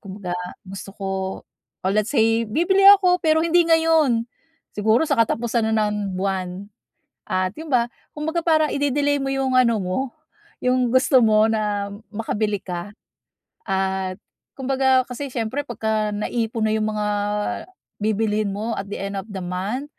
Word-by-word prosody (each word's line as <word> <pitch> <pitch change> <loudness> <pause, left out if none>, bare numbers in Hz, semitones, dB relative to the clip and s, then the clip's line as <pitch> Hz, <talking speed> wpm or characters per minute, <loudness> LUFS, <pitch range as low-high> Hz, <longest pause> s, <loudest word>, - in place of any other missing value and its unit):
kumbaga 190 -2 -6 0.3
gusto 195 +1 -8
ko, 195 -1 -4 0.8
oh, 190 - +1
let's 215 +1 +1
say, 225 -2 +2
bibili 350 - +2 0.2
ako 365 -2 +3
pero 315 0 +4
hindi 340 +1 +4
ngayon, 320 -8 +3 0.5
siguro 220 +7 +3
sa - - +2
katapusan 230 0 +1
na 215 -1 +2
ng 210 -2 -3
buwan. 190 0 -3 0.6
At 185 0 0
yun' 320 0 -7
ba, 240 -1 +3 0.3
kumbaga 320 +3 -1
parang 310 -2 +3
ide-delay 285 0 +1
mo 270 - -2
'yong 270 -1 0
ano 235 -3 +3
mo, 185 +5 -1 0.7
yung 250 0 +2
gusto 260 0 +5
mo 215 0 +5
na, 205 -2 -1 0.2
makabili 210 -1 -1
ka, 175 0 -5 0.8
at 190 -1 -1 0.4
kumbaga 265 0 +2
kasi 275 +3 -5
siyempre 250 +5 -2
pagka-naipon 220 0 -1
na 215 - +1
'yong 215 0 0
mga 210 0 -2 1.0
bibilhin 215 -1 0
mo 220 +3 -3
at 195 - -3
the 205 - -4
end 200 0 -4
of 190 - -8
the 195 -2 -6
month, 195 +10 -3
220 Hz, 145 wpm, -22 LUFS, 200-265 Hz, 1.0 s, gusto